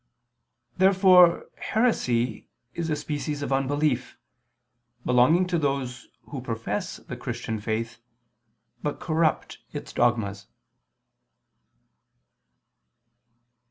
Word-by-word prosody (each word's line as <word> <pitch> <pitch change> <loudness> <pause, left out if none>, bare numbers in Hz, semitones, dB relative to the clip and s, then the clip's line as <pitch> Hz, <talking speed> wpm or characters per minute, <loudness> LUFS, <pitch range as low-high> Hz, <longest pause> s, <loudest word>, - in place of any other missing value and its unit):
Therefore 185 -2 +6
heresy 125 - 0 0.3
is 170 -1 -3
a 155 - +1
species 145 0 -3
of 140 - -1
unbelief, 135 -1 0 0.9
belonging 125 +9 +4
to 180 -2 0
those 135 -4 -2 0.2
who 135 - -4
profess 115 -4 -3
the - - -8
Christian 110 -1 -4
faith, 110 +2 -3 0.8
but 150 - -3
corrupt 160 -2 0
its - - -7
dogmas. 110 -5 0
140 Hz, 85 wpm, -26 LUFS, 120-165 Hz, 0.9 s, Therefore